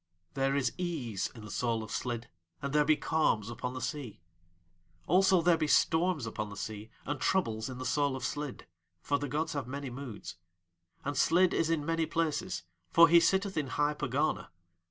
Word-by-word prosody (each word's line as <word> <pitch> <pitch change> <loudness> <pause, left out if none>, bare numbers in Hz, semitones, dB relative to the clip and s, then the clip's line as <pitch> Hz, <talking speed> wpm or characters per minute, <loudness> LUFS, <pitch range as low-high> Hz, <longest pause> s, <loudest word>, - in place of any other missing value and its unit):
There 135 0 +1
is 130 -4 +1
ease 135 - -2
in 110 -3 -10
the 105 - -8
soul 115 -1 0
of 110 - -9
Slid 120 -1 -3 0.3
and 140 0 -4
there 150 0 +5
be 155 +1 +4
calms 115 -9 +1
upon 125 +2 -4
the 130 - -5
sea; 130 -2 -4 0.9
also, 185 0 +4
there 175 -1 +5
be 155 - +1
storms 160 -2 +3
upon 105 -1 -4
the 100 - -9
sea 110 +1 -6 0.2
and 145 -1 -3
troubles 115 -12 0
in 130 - -6
the 130 - -5
soul 145 0 +1
of 130 -1 -4
Slid, 145 -1 -4 0.4
for 145 0 +1
the 145 -1 -3
gods 160 +4 -1
have 140 -5 -3
many 140 0 -5
moods. 120 -9 -7 0.7
And 145 +1 -2
Slid 175 +6 +4
is 165 - +1
in 160 -3 0
many 165 0 0
places, 165 - -1 0.3
for 165 - +7
he 170 +1 +8
sitteth 190 +3 +2
in 150 -3 0
high 145 +3 +1
Pegana. 140 -8 -1
145 Hz, 190 wpm, -31 LUFS, 120-160 Hz, 0.9 s, he